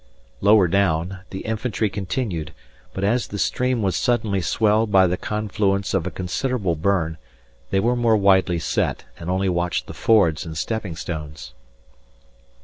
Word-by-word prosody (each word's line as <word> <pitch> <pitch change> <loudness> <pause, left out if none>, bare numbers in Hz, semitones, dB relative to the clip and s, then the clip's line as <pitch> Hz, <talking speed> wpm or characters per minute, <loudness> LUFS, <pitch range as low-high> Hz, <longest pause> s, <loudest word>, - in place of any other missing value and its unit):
Lower 100 -2 +5
down, 95 0 0
the 95 - -6
infantry 110 0 -1
continued; 95 - -3 0.4
but 95 - -5
as 115 +4 +1
the 100 - -6
stream 125 +2 0
was 95 -3 0
suddenly 110 -5 +1
swelled 105 +4 +2
by 95 -1 +6
the 90 0 +1
confluence 100 -1 -1
of 95 -4 0
a - - -1
considerable 95 +1 -2
burn, 80 -2 0 0.5
they 95 - +1
were 120 +5 +2
more 115 -2 +3
widely 95 -3 +3
set, 85 - -1
and 85 - -6
only 95 +1 0
watched 90 -1 -1
the - - -9
fords 95 -9 +3
and 80 -3 -7
stepping 105 -1 -3
stones. 75 -6 -7
95 Hz, 150 wpm, -22 LUFS, 85-110 Hz, 0.5 s, by